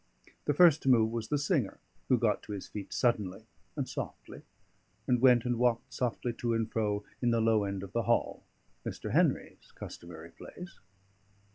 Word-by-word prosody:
The 145 - +1
first 165 -2 +6
to 135 - 0
move 110 -3 +5
was 115 -1 -3
the 150 - +1
singer, 145 - 0 0.3
who 125 - +5
got 115 -3 +1
to 105 - -7
his 100 - -6
feet 105 -2 -7
suddenly 105 -7 0 0.3
and - - -2
softly, - - -7 0.6
and 125 -2 +2
went 125 -2 +6
and 120 -1 0
walked 120 -1 +1
softly 120 -1 -2
to 120 -1 0
and 115 -1 0
fro 105 -2 0 0.2
in 120 - +2
the 115 -1 +2
low 110 -2 +3
end 100 -1 -3
of 100 - -9
the 120 - +1
hall, 120 - +1 0.4
Mr. - - -5
Henry's - - 0
customary 85 -1 -10
place. 180 - -11
115 Hz, 175 wpm, -31 LUFS, 105-125 Hz, 0.6 s, first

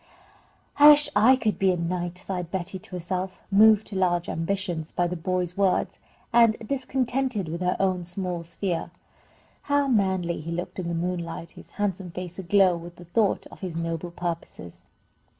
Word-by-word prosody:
"I 295 +1 +10
wish 295 0 +6
I 225 +6 +6
could 215 -8 -1
be 190 -1 +4
a 180 - -1
knight," 175 +1 -3
sighed 180 -2 -5
Betty 190 +1 -4
to 185 - -10
herself, 185 +2 -4
moved 215 +1 +6
to 205 - -8
large 175 -2 +1
ambitions 170 -1 -2
by 175 - 0
the 175 +1 -2
boy's 180 0 -2
words, 195 -2 +1 0.3
and 230 -2 +5
discontented 255 -5 -1
with 170 +3 -5
her 180 0 +1
own 185 -2 +1
small 180 -1 -4
sphere. 175 +1 -3 0.8
How 285 0 +3
manly 190 -7 +1
he 165 +2 -6
looked 175 +2 -4
in 180 - -3
the 170 - -2
moonlight, 170 -1 -3
his - - -14
handsome 195 -3 -2
face 180 +1 -7
aglow 190 0 +4
with 170 +1 -10
the 175 - -13
thought 205 +4 +1
of - - -13
his 180 -4 -5
noble 165 +1 -3
purposes! 170 - -6
180 Hz, 170 wpm, -26 LUFS, 170-200 Hz, 0.8 s, I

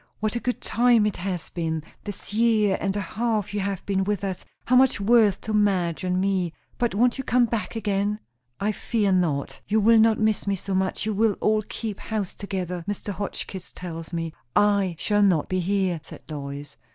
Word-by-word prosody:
"What 215 +2 -1
a - - 0
good 250 +1 -2
time 235 -2 +4
it 210 - -1
has 180 -1 -3
been, 160 -2 -2 0.2
this 205 -1 -7
year 215 -3 +3
and 195 0 0
a - - 0
half 215 +1 -1
you 205 - -1
have 195 -1 -3
been 195 -1 +1
with 205 0 -1
us! 190 -2 -3 0.2
how 255 - +3
much 260 -3 +5
worth 210 -1 +4
to 220 - -4
Madge 190 -5 +1
and 180 0 0
me! 185 -3 0 0.3
But 240 -5 0
won't 245 +4 +3
you - - -2
come 245 0 +3
back 225 -3 -3
again?" 205 -1 0 0.4
"I 210 +2 +1
fear 210 -1 0
not. 165 -7 0
You 215 +2 +2
will 225 +2 +6
not 220 0 +5
miss 215 -2 +1
me 200 - +2
so 195 +1 -5
much; 190 +1 0
you 215 - 0
will 215 +1 +3
all 215 +2 +1
keep 215 -3 -4
house 210 -4 -3
together, 180 -3 -4
Mr. 205 0 -3
Hotchkiss 190 -1 -5
tells 165 -2 -7
me." 165 -2 -3 0.2
"I 200 -4 +3
shall 205 +4 +1
not 185 -7 +3
be 185 - 0
here," 185 -2 0
said - - -12
Lois. 140 -1 -6
200 Hz, 200 wpm, -25 LUFS, 185-215 Hz, 0.4 s, will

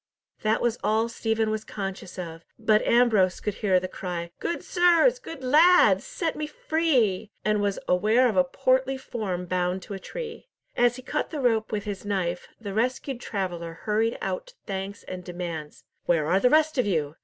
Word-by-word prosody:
That 215 +1 +1
was 240 -1 0
all 220 +2 +2
Stephen 225 -1 0
was 215 0 -2
conscious 195 -2 -6
of; 165 -2 -7
but 215 -1 +3
Ambrose 225 -6 +4
could 210 - -2
hear 190 -4 +4
the 185 - -4
cry, 175 -2 -5
"Good 340 - -3
sirs, 355 +8 +4
good 305 - -9
lads, 325 +8 +5
set 340 -10 -2
me 305 0 -3
free!" 260 - +1 0.2
and 210 -1 +2
was 200 -1 0
aware 215 +8 +4
of 220 - -1
a 185 - +5
portly 260 +6 +1
form 195 -8 -4
bound 180 +1 -1
to 205 - -8
a 195 - -5
tree. 470 - -7 0.3
As 245 0 +3
he 255 - -10
cut 300 +3 -2
the 305 - -4
rope 225 -4 +1
with 210 -1 -2
his 205 -2 -5
knife, 185 -4 -2
the 205 -3 -6
rescued 255 +3 -1
traveller 175 -5 -4
hurried 220 +2 +1
out - - -4
thanks 195 +1 -5
and 185 -1 -7
demands—"Where 170 -2 -3
are 180 +5 +3
the 250 - +4
rest 310 -1 +3
of 245 - +2
you?" 155 -5 -1
215 Hz, 180 wpm, -26 LUFS, 185-260 Hz, 0.3 s, lads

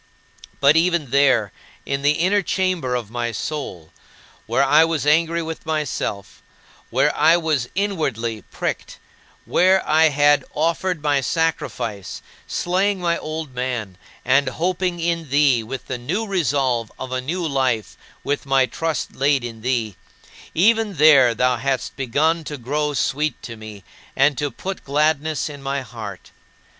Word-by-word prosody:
But 140 +2 +5
even 165 -5 +2
there, 130 -7 +3 0.3
in 140 0 -2
the 145 +1 +3
inner 185 +6 +2
chamber 185 -10 -1
of 115 -4 -4
my 120 0 -2
soul 100 - -5 0.6
where 135 - +2
I 150 +3 +6
was 165 -3 -1
angry 165 +2 +2
with 160 0 -6
myself; 150 -10 -3 0.5
where - - +2
I 160 +3 +5
was 155 -7 -1
inwardly 135 - -1
pricked, - - -4 0.5
where 190 +1 +3
I 160 +1 +5
had 145 0 +3
offered 165 +1 0
my 145 -2 +2
sacrifice, 130 - -2 0.2
slaying 190 +3 0
my 170 -1 +1
old 155 -3 -5
man, 125 -6 -3 0.3
and 135 +2 +3
hoping 180 +4 -1
in 165 -2 -1
thee 140 -4 +3
with 130 +4 -7
the 130 -2 -4
new 180 - -2
resolve 135 - 0
of 130 -1 -7
a 130 0 -1
new 165 +6 -2
life 130 -7 -1 0.3
with 145 0 -2
my 135 -1 +4
trust 165 +3 -3
laid 135 -1 +2
in 115 -2 -7
thee 115 -5 -1 0.6
even 215 +3 +3
there 140 -6 +6
thou 125 +1 +2
hadst 130 +1 -2
begun 150 +6 +1
to 150 - -5
grow 145 +4 -2
sweet 150 +3 -1
to 115 - -7
me 110 -2 -11 0.3
and 140 +2 +3
to 145 - -1
"put 190 +9 -6
gladness 150 +2 0
in 145 -2 -9
my 135 0 -2
heart." 110 -6 -9
145 Hz, 150 wpm, -21 LUFS, 125-165 Hz, 0.6 s, I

